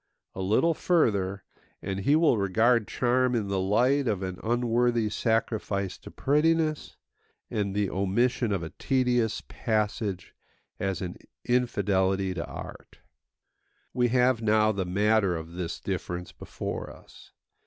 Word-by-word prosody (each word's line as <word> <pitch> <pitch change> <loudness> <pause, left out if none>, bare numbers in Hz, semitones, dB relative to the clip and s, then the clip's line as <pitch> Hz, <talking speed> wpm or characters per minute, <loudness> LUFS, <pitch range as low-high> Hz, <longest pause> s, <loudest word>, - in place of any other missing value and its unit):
A 95 - -5
little 110 - +2
further, 100 - +1 0.4
and 95 0 -4
he 140 +10 +3
will 155 -5 +4
regard 110 +4 +2
charm 125 0 +1
in 105 -4 -1
the 100 -1 0
light 125 +8 +2
of 100 -4 -1
an 95 -1 -5
unworthy 120 -1 +1
sacrifice 105 -4 -1
to - - -11
prettiness, 155 +2 +1 0.5
and 100 -2 -1
the 105 -1 +1
omission 110 +6 0
of 95 -4 -1
a 80 - -6
tedious 125 -4 0
passage 105 -4 -2 0.5
as 95 -1 -2
an 90 -1 -5 0.3
infidelity 95 -6 +1
to 85 -2 -3
art. - - -10 1.0
We 125 -1 +2
have 125 -1 +2
now 110 0 +3
the 100 -3 -2
matter 100 0 +2
of 80 0 -7
this 85 -1 -4
difference 90 -2 -4
before - - -6
us. - - -15
105 Hz, 130 wpm, -27 LUFS, 95-125 Hz, 1.0 s, will